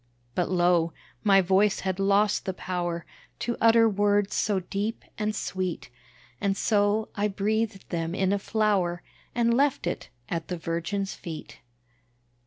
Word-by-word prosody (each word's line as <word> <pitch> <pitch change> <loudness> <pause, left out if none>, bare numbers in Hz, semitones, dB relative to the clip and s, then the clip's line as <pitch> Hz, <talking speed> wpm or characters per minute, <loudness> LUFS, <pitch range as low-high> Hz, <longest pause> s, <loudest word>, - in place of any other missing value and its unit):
But 175 - 0
lo! 175 -2 +3 0.3
my 195 -2 +6
voice 190 +3 +3
had 190 0 -2
lost 200 +1 +3
the 190 - -2
power 175 -2 -3 0.3
To 235 - -2
utter 230 0 +6
words 205 -1 +2
so 200 -3 +1
deep 200 +5 -3 0.2
and 215 0 0
sweet, 185 -7 -3 0.5
And 195 -1 +1
so, 210 +1 +2
I 205 0 +1
breathed 210 0 -1
them 165 0 -2
in 190 0 +2
a 200 - +1
flower, 195 -5 +1 0.3
And 235 -1 +3
left 275 +2 +2
it, - - -3 0.2
at 165 -2 -3
the 180 - -3
Virgin's 170 +4 -2
feet. 160 -3 -8
195 Hz, 145 wpm, -27 LUFS, 180-210 Hz, 0.5 s, my